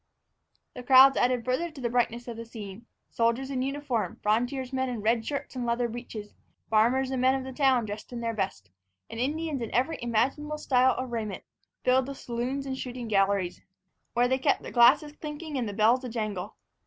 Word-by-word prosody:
The 250 - -7
crowds 265 +2 +7
added 245 -2 +1
further 255 +7 0
to 305 -3 -12
the 245 - -1
brightness 240 0 0
of 235 - -5
the 230 - -6
scene. 225 -1 -9 0.2
Soldiers 235 +4 0
in 260 -2 -1
uniform, 275 -4 -2
frontiersmen 255 +4 0
in 240 -4 -4
red 225 +2 +2
shirts 280 +2 -4
and 250 - -3
leather 240 0 0
breeches, 225 -3 -8 0.4
farmers 250 +5 +3
and 260 -1 -1
men 260 +1 +4
of 265 - -3
the 265 0 -7
town, 260 -3 +3
dressed 210 +3 -7
in 240 - -5
their 230 -1 -2
best, 185 - -4 0.4
and 225 - -6
Indians 295 +1 -1
in 230 - -4
every 260 +7 +1
imaginable 270 +6 0
style 260 -3 +3
of 255 -1 -4
raiment, 220 -4 -4 0.4
filled 255 +1 +3
the 275 - -5
saloons 255 +3 -3
and 265 -1 -4
shooting 250 -2 -5
galleries, 195 -3 +1 0.5
where 240 +1 +4
they 260 +1 +1
kept - - +1
the - - -7
glasses 275 +5 +5
clinking 300 0 -6
and 245 -5 -1
the - - -3
bells 225 +5 +3
a 250 - -4
jangle. 215 -4 -4
245 Hz, 195 wpm, -28 LUFS, 230-265 Hz, 0.5 s, crowds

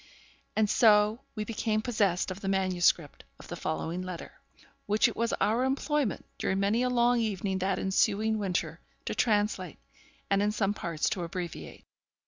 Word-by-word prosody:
And 220 -1 +3
so 210 +1 +4
we 215 - -2
became 215 0 -1
possessed 200 -7 +1
of 185 - -6
the 195 - -4
manuscript 185 -5 +1 0.2
of - - -13
the 175 - -4
following 165 +2 -3
letter, 185 -2 -7 0.6
which 210 +1 +4
it - - -5
was 230 0 0
our 230 +4 +1
employment, 275 -2 0
during 190 - 0
many 205 +4 +2
a 250 - +1
long 240 0 +3
evening 200 -3 -1
that 190 +1 0
ensuing 215 +3 +1
winter, 190 -3 -2 0.3
to - - -2
translate, 205 -6 0 0.5
and 195 0 +2
in 205 +1 +2
some 205 -1 0
parts 170 -6 -2
to 190 - -2
abbreviate. 170 0 -6
205 Hz, 160 wpm, -29 LUFS, 185-220 Hz, 0.6 s, so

